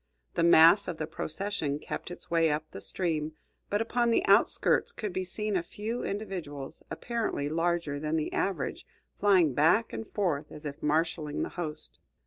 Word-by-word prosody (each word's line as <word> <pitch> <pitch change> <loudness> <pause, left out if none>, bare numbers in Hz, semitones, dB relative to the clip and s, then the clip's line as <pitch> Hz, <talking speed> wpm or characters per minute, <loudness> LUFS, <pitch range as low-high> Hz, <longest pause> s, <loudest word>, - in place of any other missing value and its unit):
The 170 - 0
mass 170 +4 +7
of 175 - -4
the 155 - -2
procession 160 -1 -3
kept 150 - -6
its 175 - -10
way 165 -1 +4
up 150 +1 0
the 95 - -8
stream, 160 - -1 0.4
but 205 +1 +1
upon 235 +1 +1
the 235 +12 +2
outskirts 470 - +3
could 210 - -5
be 185 - -1
seen 210 +3 -2
a 180 - +2
few 215 +7 -5
individuals, 170 -9 -5
apparently 230 -11 -2
larger 165 -2 0
than 155 +1 -1
the 155 -1 -1
average, 195 - -2 0.3
flying 185 -8 +4
back 165 - +3
and 225 - -5
forth 165 -8 -1
as 150 0 -10
if 140 -1 -6
marshaling 155 0 0
the - - -3
host. 155 -3 -4
170 Hz, 170 wpm, -29 LUFS, 150-205 Hz, 0.4 s, mass